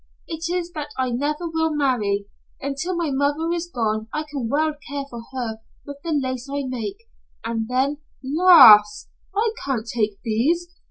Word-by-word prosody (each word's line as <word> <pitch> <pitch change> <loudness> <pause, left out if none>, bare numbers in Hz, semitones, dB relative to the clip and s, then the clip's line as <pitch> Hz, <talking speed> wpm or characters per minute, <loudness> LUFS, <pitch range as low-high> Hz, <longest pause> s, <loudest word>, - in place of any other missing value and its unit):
It 325 0 -5
is 350 -1 -2
that 300 -3 -5
I 260 -1 0
never 295 +7 -2
will 320 -1 0
marry. 215 -8 0 0.3
Until 280 +7 -3
my 335 -4 -1
mother 290 +4 0
is 345 0 -3
gone 220 -4 -1
I 305 - -2
can 280 -6 -5
well 310 +3 +1 0.2
care 285 0 -3
for 235 -1 -7
her 235 -4 -4 0.3
with 285 -1 -8
the 335 - -3
lace 260 -3 -2
I 285 0 -2
make, 260 - -5 0.4
and 225 -1 -2
then 265 +4 0 0.2
" - - -38
"Lass, 260 - +7 0.3
I 435 +2 +2
can't 255 -5 -2
take 215 -4 -1
these. 325 +11 0
280 Hz, 170 wpm, -22 LUFS, 235-320 Hz, 0.4 s, Lass